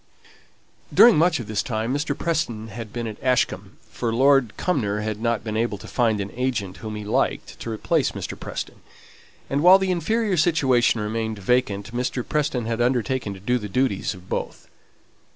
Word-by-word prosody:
During 235 Hz, -2 st, +7 dB
much 170 Hz, +1 st, +3 dB
of 120 Hz, -, -5 dB
this 105 Hz, -1 st, -1 dB
time 115 Hz, +1 st, -2 dB
Mr. 145 Hz, 0 st, -1 dB
Preston 115 Hz, -10 st, -2 dB
had 110 Hz, 0 st, -8 dB
been 120 Hz, +1 st, -4 dB
at 110 Hz, -2 st, -7 dB
Ashcombe; 105 Hz, -6 st, 0 dB
for 120 Hz, -2 st, -2 dB
Lord 135 Hz, -1 st, +4 dB
Cumnor 105 Hz, -, 0 dB
had 110 Hz, 0 st, -4 dB
not 115 Hz, -2 st, 0 dB
been 110 Hz, -1 st, -4 dB
able 115 Hz, -1 st, 0 dB
to -, -, -11 dB
find 115 Hz, -4 st, +1 dB
an 100 Hz, 0 st, -4 dB
agent 120 Hz, -7 st, -2 dB
whom 110 Hz, -1 st, -6 dB
he 105 Hz, -, -5 dB
liked 105 Hz, -, -1 dB
to -, -, -6 dB
replace 110 Hz, -1 st, 0 dB
Mr. -, -, -5 dB
Preston; -, -, -7 dB, 0.7 s
and 140 Hz, +1 st, 0 dB
while 180 Hz, +3 st, +8 dB
the 190 Hz, -1 st, 0 dB
inferior 210 Hz, +2 st, 0 dB
situation 130 Hz, -8 st, +3 dB
remained 110 Hz, +1 st, -2 dB
vacant 105 Hz, 0 st, 0 dB
Mr. 125 Hz, 0 st, -2 dB
Preston 140 Hz, -6 st, -1 dB
had 115 Hz, +1 st, -1 dB
undertaken 125 Hz, -3 st, 0 dB
to -, -, -11 dB
do 125 Hz, +6 st, 0 dB
the 105 Hz, -2 st, -6 dB
duties 115 Hz, -4 st, 0 dB
of 90 Hz, 0 st, -15 dB
both. -, -, -4 dB
115 Hz, 180 wpm, -23 LUFS, 105-135 Hz, 0.7 s, while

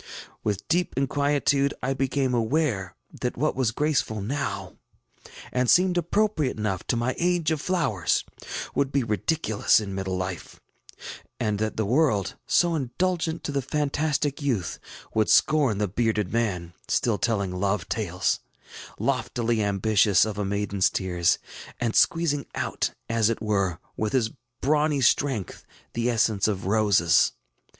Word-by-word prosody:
With 100 Hz, -1 st, -2 dB
deep 175 Hz, +2 st, 0 dB
inquietude 140 Hz, 0 st, +1 dB
I 135 Hz, +1 st, +1 dB
became 135 Hz, -1 st, 0 dB
aware 115 Hz, -, 0 dB, 0.3 s
that -, -, -2 dB
what -, -, 0 dB
was 130 Hz, -3 st, +1 dB
graceful 125 Hz, -4 st, 0 dB
now, 100 Hz, -4 st, -4 dB, 0.7 s
and 125 Hz, 0 st, +1 dB
seemed 180 Hz, 0 st, +5 dB
appropriate 175 Hz, -, +1 dB
enough 105 Hz, -4 st, -2 dB
to -, -, +1 dB
my 120 Hz, +2 st, 0 dB
age 175 Hz, -2 st, +1 dB
of 155 Hz, -2 st, -1 dB
flowers, 150 Hz, -, 0 dB, 0.5 s
would 140 Hz, 0 st, 0 dB
be 140 Hz, -2 st, +1 dB
ridiculous 110 Hz, +1 st, +2 dB
in 100 Hz, -3 st, -5 dB
middle 95 Hz, -1 st, -2 dB
life; 90 Hz, -1 st, -5 dB, 0.8 s
and 105 Hz, -1 st, 0 dB
that 110 Hz, 0 st, -2 dB
the 110 Hz, -, 0 dB
world, 120 Hz, -, +1 dB
so 175 Hz, -1 st, +3 dB
indulgent 165 Hz, +4 st, -1 dB
to -, -, -3 dB
the 140 Hz, -1 st, 0 dB
fantastic 145 Hz, +1 st, -1 dB
youth, 120 Hz, -12 st, -1 dB, 0.3 s
would 110 Hz, -1 st, +2 dB
scorn 140 Hz, -9 st, +4 dB
the 105 Hz, 0 st, 0 dB
bearded 105 Hz, -1 st, 0 dB
than, 90 Hz, -7 st, -1 dB
still 115 Hz, -4 st, +1 dB
telling 100 Hz, -5 st, 0 dB
love 95 Hz, 0 st, -1 dB
tales, 90 Hz, -5 st, -1 dB, 0.6 s
loftily 115 Hz, -2 st, 0 dB
ambitious 100 Hz, 0 st, +3 dB
of 105 Hz, -1 st, -4 dB
a -, -, 0 dB
maidenŌĆÖs 100 Hz, -2 st, 0 dB
tears, 90 Hz, -3 st, +1 dB, 0.4 s
and 115 Hz, -2 st, -1 dB
squeezing 160 Hz, -4 st, +2 dB
out, -, -, -1 dB, 0.2 s
as 115 Hz, -1 st, +2 dB
it 115 Hz, -, -1 dB
were, 100 Hz, -5 st, 0 dB, 0.2 s
with 110 Hz, -1 st, -2 dB
his 115 Hz, -4 st, +1 dB, 0.3 s
brawny 150 Hz, 0 st, +2 dB
strength, 125 Hz, -4 st, +1 dB, 0.3 s
the 120 Hz, +1 st, 0 dB
essence 110 Hz, -4 st, +2 dB
of 100 Hz, -4 st, -2 dB
roses. 100 Hz, -5 st, +3 dB
115 Hz, 140 wpm, -25 LUFS, 100-145 Hz, 0.8 s, seemed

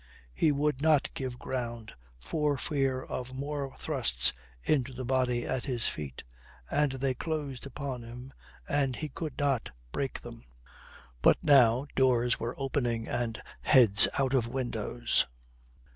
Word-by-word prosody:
He 155 Hz, -, +3 dB
would 145 Hz, -1 st, 0 dB
not 155 Hz, -2 st, +3 dB
give 130 Hz, -2 st, -4 dB
ground 120 Hz, -4 st, -4 dB, 0.2 s
for 145 Hz, -, -1 dB
fear 135 Hz, -3 st, 0 dB
of 130 Hz, 0 st, -6 dB
more 140 Hz, 0 st, -4 dB
thrusts -, -, +1 dB, 0.3 s
into 130 Hz, -4 st, +1 dB
the 130 Hz, 0 st, -5 dB
body 125 Hz, -2 st, +1 dB
at 130 Hz, -2 st, -2 dB
his 125 Hz, -5 st, 0 dB
feet, 70 Hz, -4 st, -5 dB, 0.5 s
and 145 Hz, -2 st, +2 dB
they 135 Hz, 0 st, 0 dB
closed 145 Hz, -2 st, -4 dB
upon 135 Hz, -2 st, -5 dB
him 125 Hz, +3 st, -10 dB, 0.3 s
and 135 Hz, -3 st, +1 dB
he 155 Hz, +3 st, -4 dB
could 150 Hz, 0 st, -6 dB
not 140 Hz, -5 st, 0 dB, 0.2 s
break 135 Hz, -, -3 dB
them. 120 Hz, -1 st, -10 dB, 0.8 s
But -, -, +6 dB
now 130 Hz, -3 st, +5 dB
doors 125 Hz, -2 st, +3 dB
were 115 Hz, +2 st, -3 dB
opening 120 Hz, -4 st, -1 dB
and 120 Hz, -2 st, -2 dB, 0.2 s
heads 110 Hz, -7 st, +6 dB
out 135 Hz, -1 st, +1 dB
of 125 Hz, -4 st, +2 dB
windows. 120 Hz, -, +1 dB
130 Hz, 140 wpm, -30 LUFS, 120-140 Hz, 0.8 s, But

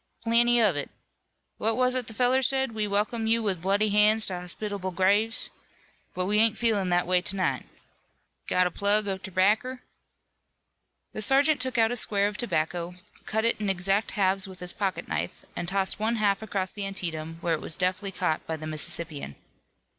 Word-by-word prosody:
"Plenty 240 Hz, +1 st, +4 dB
of 210 Hz, -8 st, +3 dB
it. 145 Hz, -, -4 dB, 0.7 s
What 225 Hz, +2 st, 0 dB
was 255 Hz, 0 st, +2 dB
it 255 Hz, -3 st, -2 dB
the 225 Hz, -, -7 dB
feller 255 Hz, +2 st, +3 dB
said 265 Hz, 0 st, +1 dB
we 215 Hz, -1 st, -2 dB
welcome 215 Hz, +3 st, -1 dB
you 230 Hz, 0 st, +2 dB
with 190 Hz, -5 st, -1 dB
bloody 200 Hz, +3 st, +1 dB
hands 210 Hz, +2 st, +4 dB
to 180 Hz, -2 st, 0 dB
hospitable 190 Hz, +2 st, -4 dB
graves 200 Hz, +5 st, +2 dB, 0.6 s
but 180 Hz, -, -1 dB
we 210 Hz, +2 st, +2 dB
ain't 225 Hz, 0 st, +3 dB
feelin' 210 Hz, -6 st, +1 dB
that 175 Hz, 0 st, +2 dB
way 180 Hz, 0 st, +2 dB
to 190 Hz, -, 0 dB
night. 185 Hz, -, -1 dB, 0.8 s
Got 180 Hz, 0 st, +3 dB
a 180 Hz, -, -1 dB
plug 205 Hz, +3 st, +2 dB
of 190 Hz, -1 st, -3 dB
terbacker?" 210 Hz, +8 st, 0 dB, 1.3 s
The 215 Hz, -, -5 dB
sergeant 275 Hz, +5 st, +3 dB
took 260 Hz, -1 st, -1 dB
out 225 Hz, 0 st, +3 dB
a -, -, -1 dB
square 205 Hz, -3 st, +3 dB
of 205 Hz, -, -5 dB
tobacco, 175 Hz, -5 st, -2 dB, 0.3 s
cut 220 Hz, +1 st, 0 dB
it 230 Hz, -2 st, 0 dB
in 205 Hz, -, -1 dB
exact 195 Hz, +3 st, 0 dB
halves 195 Hz, 0 st, +1 dB
with 185 Hz, -1 st, -11 dB
his 180 Hz, 0 st, -1 dB
pocket 195 Hz, -2 st, -3 dB
knife, 85 Hz, +1 st, -4 dB
and 175 Hz, -, -4 dB
tossed 190 Hz, +1 st, 0 dB
one 225 Hz, +2 st, 0 dB
half 205 Hz, -2 st, +1 dB
across 190 Hz, -3 st, -2 dB
the 205 Hz, -, -5 dB
Antietam, 165 Hz, -4 st, -3 dB
where 170 Hz, -1 st, 0 dB
it 160 Hz, -, -2 dB
was -, -, 0 dB
deftly 185 Hz, +2 st, -1 dB
caught 180 Hz, -4 st, -1 dB
by 160 Hz, -, -3 dB
the 155 Hz, -, -8 dB
Mississippian. 155 Hz, -, -5 dB
200 Hz, 190 wpm, -27 LUFS, 180-225 Hz, 1.3 s, Plenty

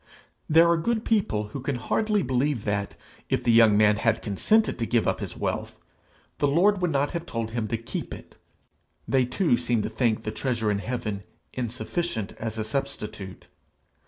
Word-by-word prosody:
There 165 Hz, +2 st, +6 dB
are 170 Hz, 0 st, +4 dB
good 225 Hz, +6 st, -1 dB
people 110 Hz, -, +1 dB
who 135 Hz, -, -6 dB
can 135 Hz, +1 st, -2 dB
hardly 210 Hz, -, 0 dB
believe 130 Hz, -1 st, 0 dB
that, 100 Hz, -1 st, -2 dB, 0.3 s
if -, -, 0 dB
the 120 Hz, -, +3 dB
young 115 Hz, -2 st, +6 dB
man 105 Hz, 0 st, +5 dB
had 115 Hz, +1 st, +1 dB
consented 215 Hz, -, +2 dB
to 115 Hz, -, -1 dB
give 120 Hz, -2 st, +2 dB
up -, -, 0 dB
his -, -, -6 dB
wealth, -, -, -3 dB, 0.6 s
the 145 Hz, -, +3 dB
Lord 185 Hz, +7 st, +3 dB
would 180 Hz, -, +2 dB
not 145 Hz, -1 st, +1 dB
then -, -, -11 dB
have 170 Hz, -, -14 dB
told 115 Hz, -1 st, -3 dB
him 115 Hz, -2 st, -2 dB
to 115 Hz, -, -1 dB
keep 115 Hz, +1 st, -6 dB
it; -, -, -10 dB, 0.7 s
they 130 Hz, -2 st, +3 dB
too 140 Hz, 0 st, +2 dB
seem 120 Hz, -3 st, 0 dB
to -, -, -2 dB
think 110 Hz, 0 st, 0 dB
the 110 Hz, -, -3 dB
treasure 115 Hz, -5 st, -1 dB
in 100 Hz, -, 0 dB
heaven 110 Hz, -3 st, -3 dB, 0.3 s
insufficient 125 Hz, -, -3 dB
as 110 Hz, 0 st, -4 dB
a 110 Hz, -, -1 dB
substitute. 110 Hz, -6 st, -5 dB
120 Hz, 190 wpm, -26 LUFS, 110-150 Hz, 0.7 s, There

